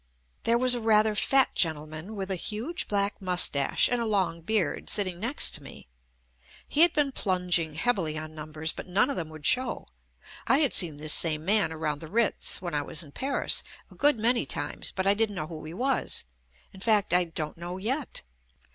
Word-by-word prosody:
There 230 +1 +3
was 255 +1 +4
a 240 - 0
rather 215 -1 +3
fat 270 +5 +2
gentleman 155 +4 -1
with 195 -1 -5
a - - 0
huge 225 - -3
black 200 0 -1
moustache 180 -7 +2
and 245 -1 -1
a - - -1
long 190 -5 -1
beard, 210 +2 -1
sitting 185 -4 0
next 240 +8 +3
to 150 - -3
me. 130 - -13 0.8
He 295 - +1
had 345 0 +7
been 290 -2 +1
plunging 180 - 0
heavily 165 -5 -1
on 155 0 -7
numbers, 155 +1 -3
but - - -9
none 200 +9 +2
of - - -3
them 160 -3 -4
would 155 -1 -11
show. 255 0 +3 0.6
I 270 - +4
had 290 -3 +3
seen 165 -6 +1
this 150 +1 0
same 155 -2 +1
man 200 -4 +4
around 155 -2 -3
the 160 - -8
Kitz, 225 +3 +1
when 175 -2 -4
I 145 - 0
was 155 +2 -1
in 145 - -14
Paris, 270 - -1 0.3
a - - -14
good 290 -3 +2
many 235 +2 +2
times, - - -1
but 190 - -3
I 200 - +6
didn't 210 -1 -1
know 155 - -3
who 155 -1 -9
he 155 - -8
was 260 +4 -1 0.2
— - - -34
in 190 - -13
fact, 205 -3 +2
I 180 0 +4
don't 160 -1 -6
know 175 +1 -6
yet. 250 +8 -3
190 Hz, 205 wpm, -27 LUFS, 160-230 Hz, 0.8 s, had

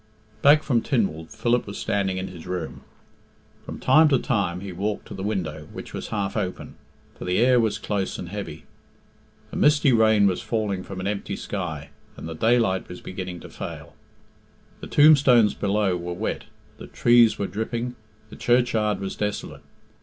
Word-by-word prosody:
Back 150 +3 +6
from 120 -5 +1
Tynwald, 95 - -1
Philip 120 -1 0
was 100 - -6
standing 95 -2 -1
in 95 +1 -3
his 90 -2 -10
room. 90 -3 -5 0.8
From - - -7
time 155 +5 +5
to 140 -3 +4
time 100 -9 -1
he 100 -1 -6
walked 100 +4 -3
to - - -7
the 95 - -7
window, 85 -7 -3
which - - -9
was - - -5
half 100 -2 -3
open, 95 -4 -4 0.4
for - - -9
the 90 0 0
air 125 +2 +5
was 110 -2 +1
close 100 -2 -2
and 85 - -7
heavy. 100 -6 -6 0.9
A - - -8
misty 145 -3 +4
rain 110 -2 +4
was 95 -3 +1
falling 105 -5 -2
from 95 0 -7
an - - -5
empty 100 0 -3
sky, 85 -9 -5 0.3
and - - -7
the 80 - -5
daylight 110 0 +1
was 90 - -8
beginning 90 -2 -7
to - - -10
fail. - - -8 0.9
The - - -8
tombstones 135 -8 +6
below 100 -2 0
were 90 0 -4
wet, - - -3 0.3
the - - -9
treed 120 -1 +4
were 100 - -1
dripping, 115 +4 -3 0.4
the - - -9
churchyard 115 -4 +1
was 95 -1 -4
desolate. 105 -1 -4
100 Hz, 175 wpm, -24 LUFS, 95-120 Hz, 0.9 s, Back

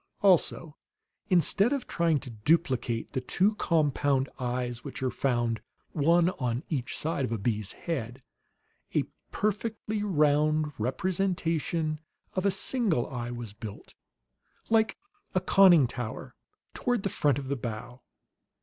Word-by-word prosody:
Also, 170 -4 +3 0.5
instead 190 +4 +4
of 280 -3 -1
trying 165 -3 +1
to 125 - -9
duplicate 120 -1 0
the 130 - -2
two 190 +11 +2
compound 145 -7 +1
eyes 125 -1 -2
which 140 -2 -6
are 130 - +1
found, 120 -4 0 0.3
one 170 +4 +3
on 125 -1 -1
each 135 -7 -2
side 155 -3 -1
of 125 - -2
a 115 - 0
bee's 105 -1 -1
head, 130 -6 -4 0.7
a - - +4 0.3
perfectly 215 0 -2
round 155 -4 +2
representation 165 - -1 0.3
of 185 +1 +1
a - - +5
single 195 - +1
eye 120 -2 -4
was 120 -4 -6
built, 105 -1 -9 0.8
like 220 -1 +3 0.4
a - - +5
conning 185 -5 +6
tower, 120 -2 -5 0.4
toward 245 -5 0
the - - +1
front 145 -7 +1
of 140 -2 -5
the 140 - -1
bow. 120 +1 -6
150 Hz, 130 wpm, -28 LUFS, 125-180 Hz, 0.8 s, conning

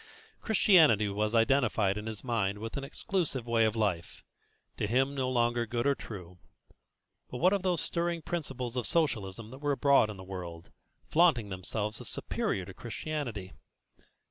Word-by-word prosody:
Christianity 160 - +5
was 105 +3 -1
identified 115 -5 +3
in 105 +1 -5
his 110 -2 -6
mind 110 -5 0
with 110 +2 -6
an 140 - -3
exclusive 145 - -2
way 115 -1 +3
of 110 0 0
life, 100 -7 -2 0.5
to - - -1
him 135 +5 +2
no 130 -2 -1
longer 120 -1 +1
good 120 +2 -2
or 140 - +4
true; 90 -8 -9 0.9
but 125 - -5
what 180 +8 +4
of 200 - +1
those 180 -3 0
stirring 170 -1 -1
principles 135 -8 -4
of 125 - -1
Socialism 115 - 0
that 130 - -10
were 145 0 0
abroad 140 -5 +4
in 105 - -7
the 95 - -9
world, 90 -3 -8 0.3
flaunting 155 -11 +3
themselves 105 +3 -4
as - - -7
superior 95 - -2
to 95 - -10
Christianity? 120 -4 -5
120 Hz, 165 wpm, -30 LUFS, 105-140 Hz, 0.9 s, Christianity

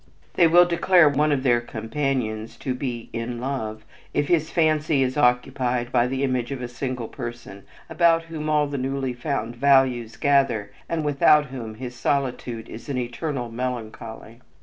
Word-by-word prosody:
They 170 - +5
will 175 +2 +7
declare 175 -1 +4
one 150 +1 +2
of 135 -2 0
their 120 -3 +3
companions 115 -1 -3
to 130 - -3
be 125 -3 -5
"in 115 +1 -4
love" 110 -5 -4 0.3
if 145 - +1
his 160 -3 +2
fancy 155 -3 +2
is 130 0 -1
occupied 125 -2 +1
by 120 -1 +3
the 135 +2 -2
image 130 -2 -1
of 135 - -4
a 125 - -4
single 125 -1 -4
person 120 -6 -8 0.2
about 165 0 +3
whom 160 -2 -5
all 150 -1 +3
the 140 -1 -4
newly 135 0 -2
found 120 -2 -3
values 130 -4 +3
gather, 130 -7 +2 0.2
and 160 -2 -1
without 150 +1 +4
whom 115 -4 -6
his 125 +2 -7
solitude 125 -4 -2
is 115 - -10
an 135 - -2
eternal 125 0 -3
melancholy. 115 -1 -6
130 Hz, 165 wpm, -24 LUFS, 120-145 Hz, 0.3 s, will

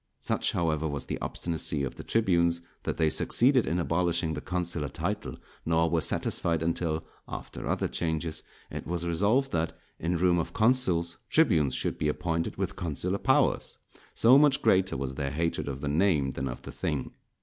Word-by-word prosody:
Such, - - -1
however, 80 -2 0
was 70 -2 -4
the - - -4
obstinacy 80 -4 -2
of 65 - -3
the - - -9
tribunes, 85 -6 +2 0.2
that - - -3
they 80 -1 +2
succeeded 130 0 +3
in 85 - 0
abolishing 85 -1 0
the - - -4
consular 85 -5 -2
title, - - -3 0.3
nor 80 0 +2
were 85 -1 +2
satisfied 85 0 0
until, 80 -1 -1 0.2
after - - -6
other - - 0
changes, 80 -1 -2 0.3
it - - -6
was 85 0 -2
resolved 105 +11 +2
that, 80 0 -1 0.2
in 85 +2 0
room 90 0 +3
of 85 - -3
consuls, 95 -8 +2
tribunes 80 - +3
should - - -2
be 75 - +1
appointed 85 +2 -2
with 95 0 -3
consular 90 +3 -2
powers; 135 0 +2 0.4
so 125 +4 +7
much 145 -2 +4
greater 95 -6 +3
was 65 0 -3
their 70 0 -2
hatred 85 +2 -1
of 70 -1 -4
the 75 - -3
name 75 -3 +2
than 65 +1 -3
of - - -6
the - - -7
thing. 75 -5 -3
85 Hz, 175 wpm, -28 LUFS, 80-90 Hz, 0.4 s, so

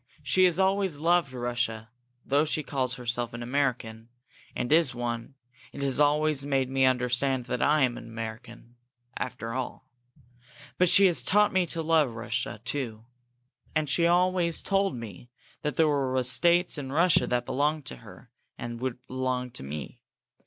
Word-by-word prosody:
She 185 0 +4
has 175 -2 +2
always 190 -3 +1
loved 165 -2 +2
Russia, 120 -3 -3 0.3
though 140 +2 +3
she 155 0 -1
calls 130 -2 -2
herself 120 -1 -3
an 120 - -6
American, 120 -4 -2 0.5
and 125 +2 -3
is 155 -5 +4
one, 120 +2 -4 0.4
and 140 - -6
has 135 -1 +1
always 150 -1 +2
made 135 -2 0
me 135 0 +3
understand 125 0 +1
that 125 0 -3
I 150 0 +3
am 125 -2 0
an - - -11
American, 115 +1 -8 0.4
before 115 -2 -4
all. 130 0 -5 0.9
But 180 -1 +4
she 200 - +6
has 175 -3 +3
taught 210 +1 +3
me 185 -2 +2
to 165 0 -3
love 155 -7 +2
Russia, 115 -2 -4
too. 115 -4 -4 0.7
And 155 -1 +1
she 140 +5 +2
has 170 - +4
always 175 -1 +2
told 195 -5 +1
me 115 -1 -9 0.3
that 150 -3 -2
there 160 - +4
were 135 -3 0
estates 170 +7 +3
in 135 -2 -6
Russia 170 +4 +3
that 125 0 0
belonged 145 +3 0
to 65 - -7
her, - - -15 0.3
and 120 0 -6
would 130 -1 -4
belong 130 -1 -2
to - - -4
me. 70 +2 -7
130 Hz, 165 wpm, -27 LUFS, 120-155 Hz, 0.9 s, she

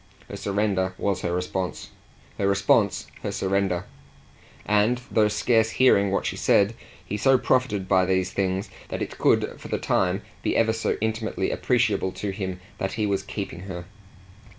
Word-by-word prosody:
Her - - -6
surrender 95 -2 0
was 95 -2 -1
her 85 - -1
response, 90 +1 -3 0.5
her 100 - +2
response 100 +1 +2 0.2
her - - -3
surrender; 95 -2 0 0.8
and, 105 +4 +3
though 110 -2 +4
scarce 110 +1 +2
hearing 105 -5 +4
what 100 - 0
she - - -1
said, 100 +2 +3 0.3
he 105 - -3
so 130 +6 +4
profited 115 -7 +1
by 95 -1 +4
these 95 0 +1
things 95 0 -1 0.2
that - - -3
it - - -8
could - - +2
for - - -8
the - - -1
time - - 0 0.2
be - - 0
ever 110 -1 +3
so 115 - -1
intimately 110 0 -1
appreciable 95 - +1
to 100 - -3
him 95 -2 -4 0.2
that 95 - -2
he 110 -1 0
was 100 -1 0
keeping 95 -3 -6
her. 90 -1 -6
100 Hz, 165 wpm, -25 LUFS, 95-110 Hz, 0.8 s, though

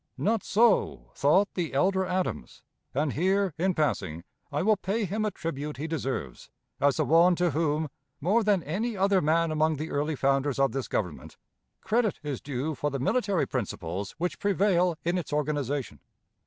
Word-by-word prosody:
Not 220 0 +1
so 200 - +2
thought 185 +9 +3
the 170 -6 -3
elder 190 +6 +2
Adams; 180 - -3 0.3
and 145 +1 0
here, 190 +2 +1
in 185 +1 +1
passing, 95 - -1 0.3
I 145 +3 -1
will 215 +2 +4
pay 205 +3 -1
him 210 +4 -1
a - - +1
tribute 150 -5 -5
he 145 - -4
deserves, 135 - -4 0.3
as 140 -1 +3
the - - +2
one 170 +5 +5
to 175 -1 +1
whom, 155 +1 0 0.3
more 200 +10 +2
than 200 -5 +2
any 210 +8 -2
other 195 0 +3
man 160 +2 +2
among 155 0 +2
the 155 +3 -5
early 150 +2 -1
founders 135 0 +1
of 135 -2 +3
this 135 0 -3
Government, 90 -8 -4 0.4
credit 220 -2 +1
is 145 -4 -4
due 140 +3 -3
for 145 +2 -2
the 140 - -3
military 200 - +1
principles 100 -5 -4
which 175 +3 -2
prevail 185 -4 +2
in 175 +2 +1
its 170 - -7
organization. 145 -2 -2
160 Hz, 170 wpm, -28 LUFS, 140-190 Hz, 0.4 s, one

